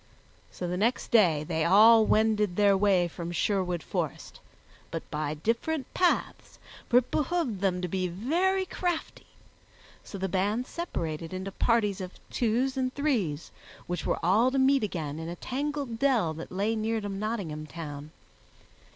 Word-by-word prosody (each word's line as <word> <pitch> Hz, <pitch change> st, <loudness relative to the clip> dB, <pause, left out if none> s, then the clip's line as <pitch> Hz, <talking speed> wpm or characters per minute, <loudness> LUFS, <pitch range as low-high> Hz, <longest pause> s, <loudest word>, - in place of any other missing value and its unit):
So 180 Hz, -, -5 dB
the 180 Hz, +1 st, -2 dB
next 230 Hz, +6 st, 0 dB
day 175 Hz, -10 st, +4 dB
they 160 Hz, 0 st, -1 dB
all 215 Hz, +5 st, +7 dB
wended 210 Hz, -3 st, +2 dB
their 200 Hz, -1 st, +4 dB
way 190 Hz, -3 st, +3 dB
from 170 Hz, 0 st, -6 dB
Sherwood 180 Hz, -1 st, 0 dB
Forest, -, -, -4 dB, 0.5 s
but -, -, -5 dB
by 150 Hz, 0 st, -2 dB
different 235 Hz, -, -2 dB
paths, 360 Hz, -1 st, 0 dB, 0.3 s
for 240 Hz, -, +5 dB
it 250 Hz, -, +2 dB
behooved 295 Hz, -, -1 dB
them 185 Hz, -2 st, 0 dB
to -, -, 0 dB
be 185 Hz, +1 st, -1 dB
very 340 Hz, -, 0 dB
crafty; 355 Hz, -3 st, -3 dB, 0.8 s
so 200 Hz, -, -8 dB
the 190 Hz, 0 st, -2 dB
band 205 Hz, +6 st, 0 dB
separated 165 Hz, -, -4 dB
into 190 Hz, +1 st, -5 dB
parties 210 Hz, -2 st, +1 dB
of 185 Hz, 0 st, -6 dB, 0.2 s
twos 250 Hz, +3 st, 0 dB
and 255 Hz, -1 st, 0 dB
threes, 220 Hz, -, -1 dB, 0.3 s
which 175 Hz, -1 st, -3 dB
were -, -, 0 dB
all 210 Hz, +9 st, +4 dB
to 270 Hz, -, -2 dB
meet 270 Hz, 0 st, +4 dB
again 160 Hz, -7 st, -3 dB
in 165 Hz, +1 st, -5 dB
a 175 Hz, -, -5 dB
tangled 275 Hz, -, -3 dB
dell 235 Hz, -, +2 dB
that 160 Hz, +1 st, -8 dB
lay 205 Hz, +4 st, 0 dB
near 220 Hz, +1 st, -1 dB
to 205 Hz, -, -5 dB
Nottingham 195 Hz, -7 st, -4 dB
Town. 150 Hz, -2 st, -7 dB
205 Hz, 160 wpm, -28 LUFS, 175-250 Hz, 0.8 s, all